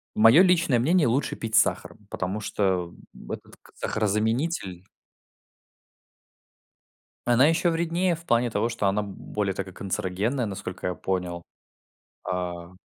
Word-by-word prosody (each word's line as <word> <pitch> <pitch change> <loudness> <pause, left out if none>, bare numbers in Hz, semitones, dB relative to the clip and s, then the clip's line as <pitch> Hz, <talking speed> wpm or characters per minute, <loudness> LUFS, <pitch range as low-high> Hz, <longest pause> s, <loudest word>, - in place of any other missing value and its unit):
мое 115 +11 +7
личное 170 -9 +3
мнение, 160 +5 +3
лучше 125 +5 0
пить 110 -1 -4
с - - +9
сахаром, 105 - -4
потому 95 +3 -3
что 95 -4 -1 0.2
в - - -11
этот - - -8
к - - -20
сахарозаменитель 105 - -1 2.5
она 130 +4 +6
еще 165 +2 +2
вреднее 170 +2 0
в 165 - -15
плане 120 -4 +2
того, 110 +2 0
что 110 -3 -1
она 105 +2 +1
более 100 0 -3
такая 95 -1 -5
канцерогенная, 100 +7 -2
насколько 95 -2 -6
я 90 - -1
понял. 90 -2 -3 0.9
А 90 -1 -4
105 Hz, 130 wpm, -26 LUFS, 95-135 Hz, 2.5 s, с